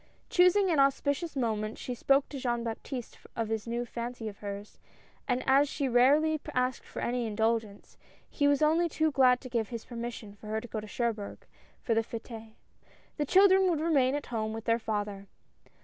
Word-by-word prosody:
Choosing 365 Hz, +1 st, +4 dB
an 310 Hz, -, +2 dB
auspicious 285 Hz, +4 st, +1 dB
moment 220 Hz, -4 st, -1 dB
she 250 Hz, -, -5 dB
spoke 275 Hz, +3 st, +2 dB
to 280 Hz, -, -6 dB
Jean 240 Hz, -2 st, -1 dB
Baptiste 235 Hz, +2 st, -6 dB, 0.2 s
of 225 Hz, -2 st, -2 dB
this 220 Hz, 0 st, -3 dB
new 240 Hz, +1 st, -2 dB
fancy 235 Hz, -1 st, -5 dB
of 205 Hz, -2 st, -8 dB
hers, 205 Hz, 0 st, -7 dB, 0.5 s
and 250 Hz, 0 st, 0 dB
as 275 Hz, +2 st, +4 dB
she 280 Hz, -1 st, -2 dB
rarely 290 Hz, +5 st, +4 dB
asked 255 Hz, 0 st, 0 dB
for -, -, -6 dB
any 240 Hz, -1 st, -1 dB
indulgence, 220 Hz, -1 st, -2 dB, 0.3 s
he 285 Hz, -, +1 dB
was 285 Hz, +1 st, +3 dB
only 330 Hz, +3 st, +3 dB
too 315 Hz, 0 st, +1 dB
glad 255 Hz, -3 st, +4 dB
to -, -, -8 dB
give 235 Hz, -3 st, -2 dB
his 235 Hz, -2 st, -6 dB
permission 235 Hz, -3 st, -6 dB
for 210 Hz, +1 st, -13 dB
her 220 Hz, +1 st, -1 dB
to 240 Hz, -, -9 dB
go 220 Hz, -, -4 dB
to 215 Hz, -, -8 dB
Cherbourg 220 Hz, -2 st, -3 dB, 0.4 s
for 230 Hz, -, +1 dB
the 225 Hz, -, +3 dB
f^tes. 225 Hz, -1 st, -8 dB, 0.6 s
The 295 Hz, -, 0 dB
children 380 Hz, +1 st, +6 dB
would 330 Hz, -4 st, +1 dB
remain 285 Hz, -5 st, +2 dB
at 290 Hz, -, -3 dB
home 220 Hz, -1 st, -1 dB
with 225 Hz, 0 st, -6 dB
their 230 Hz, 0 st, +2 dB
father. 205 Hz, -3 st, -3 dB
240 Hz, 190 wpm, -30 LUFS, 220-285 Hz, 0.6 s, children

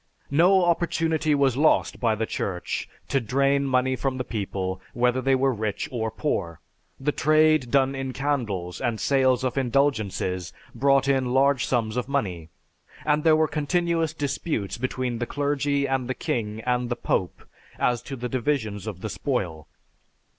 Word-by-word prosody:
No 180 Hz, +5 st, +5 dB
opportunity 165 Hz, -3 st, +1 dB
was 135 Hz, -3 st, +2 dB
lost 150 Hz, +4 st, +2 dB
by 115 Hz, -3 st, +2 dB
the 110 Hz, +1 st, -1 dB
Church 90 Hz, -4 st, -3 dB, 0.2 s
to 135 Hz, -, +1 dB
drain 140 Hz, +4 st, +2 dB
money 130 Hz, 0 st, +2 dB
from 130 Hz, 0 st, -2 dB
the 130 Hz, -, -2 dB
people 95 Hz, -5 st, -3 dB
whether 125 Hz, +1 st, +2 dB
they 135 Hz, +1 st, +3 dB
were 135 Hz, 0 st, +2 dB
rich 105 Hz, -2 st, -3 dB
or 110 Hz, -3 st, -2 dB
poor. 85 Hz, -, -2 dB, 0.4 s
The 150 Hz, +2 st, 0 dB
trade 155 Hz, -3 st, +3 dB
done 135 Hz, +1 st, +3 dB
in 135 Hz, -1 st, -3 dB
candles, 115 Hz, -11 st, -2 dB
and 120 Hz, -4 st, -1 dB
sales 130 Hz, -2 st, +2 dB
of 130 Hz, +1 st, 0 dB
indulgences 115 Hz, -, 0 dB, 0.2 s
brought 135 Hz, 0 st, +3 dB
in 130 Hz, -2 st, +1 dB
large 135 Hz, -1 st, +3 dB
sums 115 Hz, -2 st, 0 dB
of 125 Hz, -, -1 dB
money, 90 Hz, -, -2 dB, 0.6 s
and 150 Hz, 0 st, +2 dB
there 160 Hz, -1 st, +6 dB
were 155 Hz, 0 st, +3 dB
continuous 165 Hz, +2 st, 0 dB
disputes 140 Hz, -, -2 dB
between 125 Hz, -1 st, -2 dB
the 120 Hz, -, -2 dB
clergy 145 Hz, 0 st, 0 dB
and 130 Hz, -2 st, -1 dB
the 130 Hz, -, -1 dB
king 110 Hz, -2 st, -3 dB
and 125 Hz, 0 st, 0 dB
the 120 Hz, -, 0 dB
Pope 95 Hz, -5 st, -2 dB, 0.3 s
as 120 Hz, -1 st, +1 dB
to 140 Hz, -, -7 dB
the 125 Hz, -1 st, -4 dB
divisions 120 Hz, -6 st, -2 dB
of 95 Hz, -4 st, -6 dB
the 110 Hz, -, -4 dB
spoil. 95 Hz, -, -3 dB
130 Hz, 160 wpm, -25 LUFS, 110-140 Hz, 0.6 s, there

